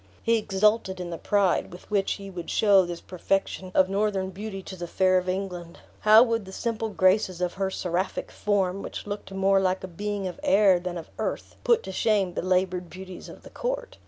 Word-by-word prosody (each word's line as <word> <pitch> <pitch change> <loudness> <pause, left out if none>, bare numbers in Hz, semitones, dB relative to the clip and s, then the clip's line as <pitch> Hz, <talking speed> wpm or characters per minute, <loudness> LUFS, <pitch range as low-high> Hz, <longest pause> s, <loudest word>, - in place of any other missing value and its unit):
He 230 -1 +3
exulted 210 -1 +1
in 175 -1 -5
the 165 - -5
pride 200 -3 +1
with 180 +4 -13
which 200 -2 +1
he 195 -1 -8
would 175 -2 -7
show 195 -4 +4
this 175 -1 -5
perfection 190 0 -2
of 185 - +5
northern 195 -1 0
beauty 195 0 -6
to 190 - -8
the 175 -1 -6
fair 185 +1 +3
of 180 0 -5
England; 180 -3 -4 0.2
how 215 +2 +7
would 230 -4 -1
the 190 - -10
simple 225 +1 -2
graces 185 -2 +2
of 180 -1 -1
her 195 0 -1
seraphic 185 0 -2
form, 195 -2 0
which - - -6
looked 205 -1 -6
more 195 0 +3
like 185 0 0
a - - -4
being 205 +2 -4
of 180 -2 -5
air 195 -2 +5
than 175 0 -4
of 165 - -9
earth, - - -3
put 485 -2 +3
to 190 - -6
shame 195 -2 +1
the - - -2
labored 185 -1 0
beauties 185 0 -9
of - - -13
the - - -13
court? - - -4
190 Hz, 210 wpm, -26 LUFS, 185-205 Hz, 0.2 s, how